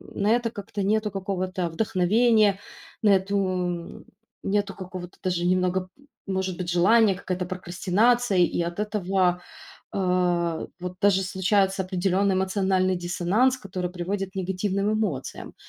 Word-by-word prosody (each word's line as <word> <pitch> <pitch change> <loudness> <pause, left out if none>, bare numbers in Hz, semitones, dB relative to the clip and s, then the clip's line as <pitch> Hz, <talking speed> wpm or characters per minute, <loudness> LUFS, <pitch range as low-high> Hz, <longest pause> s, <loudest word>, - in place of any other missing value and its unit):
на 205 - +1
это 240 0 +2
как-то 205 -1 -6
нету 210 +2 +1
какого-то 185 -2 -2
вдохновения, 210 +3 +3 0.4
на 210 - +4
эту, 195 +1 +2
м 180 -3 -2 0.4
Нету 200 0 0
какого-то 185 -1 -8
даже 180 -2 0
немного, 185 +1 +2
п 280 - -23 0.2
может 190 -2 -2
быть, 180 - -4
желания, 195 +4 +4
какая-то 185 0 -3
прокрастинация, 190 +5 +1
и 175 0 +2
от 170 0 -3
этого, 190 -4 0 0.5
а, 180 -3 0
вот 180 0 -5
даже 195 -1 +4
случается 190 +1 +1
определённый 190 +1 +1
эмоциональный 190 -1 +1
диссонанс, 180 +9 +1
который 185 -6 -4
приводит 190 +2 -3
к - - -33
негативным 195 +3 -1
эмоциям. 195 -12 -3
190 Hz, 130 wpm, -25 LUFS, 180-205 Hz, 0.5 s, на